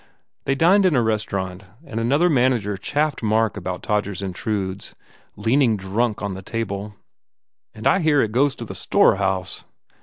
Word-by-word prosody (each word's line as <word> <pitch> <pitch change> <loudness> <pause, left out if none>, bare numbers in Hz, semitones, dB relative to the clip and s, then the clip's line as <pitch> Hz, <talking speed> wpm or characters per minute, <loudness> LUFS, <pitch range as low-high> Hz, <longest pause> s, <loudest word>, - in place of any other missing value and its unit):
They 135 - +1
dined 185 +6 +5
in 170 - +2
a 125 - +4
restaurant 100 -4 -2 0.2
and 115 -5 -5
another 140 +9 +3
man 130 -5 +3
ager 105 -4 -2
chaffed 145 +9 -1
Mark 110 -1 +1
about 90 -2 -5
"Todgers 100 -2 -1
Intrudes" 95 0 -4 0.4
leaning 115 +2 +2
drunk 105 +4 -1
on 100 -1 -2
the 95 - -7
table. 105 -1 -4 0.8
"And 110 - -9
I 195 - +4
hear 155 -5 +3
it 110 - -2
goes 135 +4 +2
to 120 - -7
the - - -7
storehouse?" 95 -1 +1
110 Hz, 160 wpm, -22 LUFS, 100-130 Hz, 0.8 s, dined